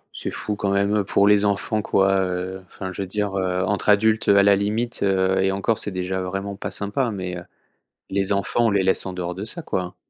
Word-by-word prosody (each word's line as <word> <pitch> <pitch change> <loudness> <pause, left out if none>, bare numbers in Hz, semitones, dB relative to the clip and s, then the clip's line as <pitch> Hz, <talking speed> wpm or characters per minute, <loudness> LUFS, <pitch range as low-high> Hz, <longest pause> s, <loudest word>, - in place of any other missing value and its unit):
C'est - - -4
fou 105 - -4
quand 100 -1 -2
même, 100 +1 +1
heu, 105 - +1
pour 100 +1 +2
les 105 0 +5
enfants, 105 +1 0
quoi, 95 -1 +2
heu, 95 0 -3
enfin 95 +1 -7
je 100 - -5
veux 95 - -3
dire, 100 0 -2
heu, 95 -1 0
entre 100 +1 -1
adultes, 110 +1 +3
heu, 100 - +6
à 100 - +6
la 100 0 +6
limite, 110 +4 -2
heu 95 -1 +2
et 95 0 +2
encore, 100 +3 0
c'est - - -2
déjà 95 0 -3
vraiment 95 +2 -4
pas - - -5
sympa 105 +5 -1
mais, 90 -4 -4
heu, 90 - -8 0.7
les 95 0 -1
enfants, 100 +4 +1
on - - +3
les 100 -2 +1
laisse 95 - +3
en 95 - -5
dehors 90 -1 -4
de 95 - -5
ça, 165 +10 -3
quoi! 90 - -4
100 Hz, 245 wpm, -22 LUFS, 95-105 Hz, 0.7 s, heu